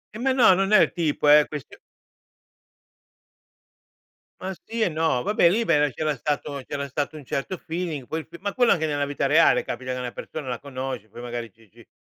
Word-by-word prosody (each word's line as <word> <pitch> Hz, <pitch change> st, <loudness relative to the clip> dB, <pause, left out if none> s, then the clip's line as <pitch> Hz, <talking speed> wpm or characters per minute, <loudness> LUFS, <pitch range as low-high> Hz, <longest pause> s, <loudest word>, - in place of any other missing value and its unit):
Eh -, -, -6 dB
ma 265 Hz, +2 st, +1 dB
no, 245 Hz, -7 st, +6 dB
non 195 Hz, +2 st, 0 dB
è 210 Hz, -, +8 dB
il -, -, +3 dB
tipo, 155 Hz, -4 st, 0 dB
è 150 Hz, 0 st, +7 dB
questio 150 Hz, -3 st, -8 dB, 2.6 s
Ma 190 Hz, +1 st, -4 dB
sì 230 Hz, 0 st, -4 dB
e 200 Hz, -, +3 dB
no, 160 Hz, -5 st, 0 dB
vabbè 205 Hz, -5 st, +4 dB
lì, 225 Hz, +6 st, +1 dB
beh, 150 Hz, -8 st, +2 dB
c'era 155 Hz, +1 st, -1 dB
stato 145 Hz, +1 st, -3 dB
c'era 140 Hz, -1 st, -4 dB
stato 145 Hz, +3 st, -3 dB
un 150 Hz, -, -9 dB
certo 140 Hz, +7 st, -3 dB
feeling. 165 Hz, -6 st, -5 dB
Poi 160 Hz, 0 st, -4 dB
ma 200 Hz, +1 st, -3 dB
quello 245 Hz, -2 st, +3 dB
anche 160 Hz, -2 st, +2 dB
nella 145 Hz, -1 st, 0 dB
vita 140 Hz, 0 st, -2 dB
reale, 155 Hz, +4 st, +5 dB
capita 130 Hz, +1 st, -4 dB
che 125 Hz, -, -4 dB
una 125 Hz, -1 st, -4 dB
persona 150 Hz, +2 st, -7 dB
la 125 Hz, -2 st, -3 dB
conosci, 130 Hz, -5 st, -6 dB
poi 115 Hz, +3 st, -11 dB
magari 120 Hz, -2 st, -5 dB
ci 110 Hz, +1 st, -24 dB
ci 115 Hz, +1 st, -19 dB
150 Hz, 200 wpm, -24 LUFS, 130-175 Hz, 2.6 s, è